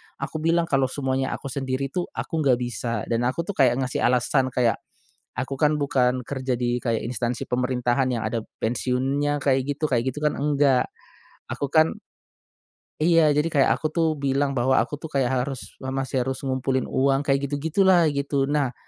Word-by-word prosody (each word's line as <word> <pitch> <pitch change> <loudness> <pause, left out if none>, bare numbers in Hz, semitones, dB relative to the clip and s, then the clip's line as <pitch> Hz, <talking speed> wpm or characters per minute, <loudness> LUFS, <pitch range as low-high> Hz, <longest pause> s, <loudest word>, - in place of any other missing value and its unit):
aku 155 - -5
bilang, 165 +2 +2
"Kalau 135 -4 +1
semuanya 130 -1 -2
aku 140 - -7
sendiri 135 0 -2
tuh, 180 -1 -2
aku 160 - -3
nggak 135 -5 +4
bisa." 120 -3 -3
dan 120 +1 +1
aku 165 +6 -1
tuh 205 - -4
kayak 125 -3 +4
ngasih 125 - -2
alasan 125 +2 +2
kayak, 120 -3 +2 0.6
"Aku 130 +1 -2
kan 150 +2 +2
bukan 125 -3 +1
kerja 130 -3 -2
di 120 0 -1
kayak 115 -2 0
instansi 120 0 -2
pemerintahan 125 +1 0
yang 115 -3 -2
ada 115 0 -2 0.2
pensiunnya, 135 +5 0
kayak 135 0 0
gitu 155 - +1
kayak 125 -1 0
gitu 140 - -8
kan, 150 - +1
enggak. 140 -3 +2 0.6
Aku 140 0 -4
kan" 160 0 +4 1.1
Iya. 165 -2 +5
Jadi 150 +2 +2
kayak 135 -2 +4
aku 155 - -2
tuh 165 -1 +2 0.2
bilang, 140 +1 +1
bahwa 130 +2 +2
"Aku 145 - -6
tuh 160 - -7
kayak 130 -2 +2
harus, 130 0 -1 0.2
me 130 - -7
masih 135 0 -2
harus 130 0 -3
ngumpulin 130 0 0
uang." 135 +1 +2
Kayak 140 -1 +2
gitu-gitulah 170 +6 +3
gitu. 140 -1 0
Nah 140 -4 0
135 Hz, 180 wpm, -24 LUFS, 125-145 Hz, 1.1 s, Iya